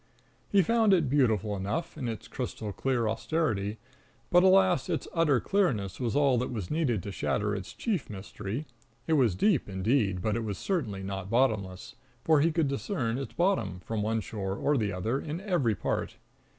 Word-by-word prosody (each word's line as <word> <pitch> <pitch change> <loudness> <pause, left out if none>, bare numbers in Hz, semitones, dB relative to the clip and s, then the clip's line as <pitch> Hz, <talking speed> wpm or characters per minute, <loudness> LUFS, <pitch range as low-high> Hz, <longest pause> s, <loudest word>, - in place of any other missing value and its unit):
He 195 -2 +4
found 220 0 +4
it 155 -8 0
beautiful 110 -7 +2
enough, 105 - -3
in 135 -5 -4
its 110 -3 -5
crystal 105 -2 -5
clear 120 +1 0
austerity; 110 -4 -1 0.5
but, 175 - +7
alas, 185 -6 +4
its - - -2
utter 150 -6 +3
clearness 115 - 0
was 120 -2 -1
all 140 -4 +4
that 125 - -2
was 105 -7 -5
needed 135 - 0
to 100 - -5
shatter 105 +1 -1
its 95 -3 -5
chief 190 - -2
mystery. 105 +5 -5 0.4
It 160 - +1
was 125 - +3
deep, 160 - +2
indeed, 100 0 +1
but 110 -1 +1
it 115 - -1
was 105 -3 -3
certainly 115 - -2
not 95 0 -5
bottomless, 110 -6 0 0.3
for 155 -3 +4
he 165 +3 +3
could 160 -2 +1
discern 135 - -2
its 135 - -6
bottom, 170 - 0
from 110 +2 -3
one 110 +1 0
shore 95 -2 -4
or 145 +8 +1
the 105 -6 0
other, 110 +9 -1
in 155 +2 -4
every 175 - +1
part. - - -2
120 Hz, 180 wpm, -29 LUFS, 105-155 Hz, 0.5 s, but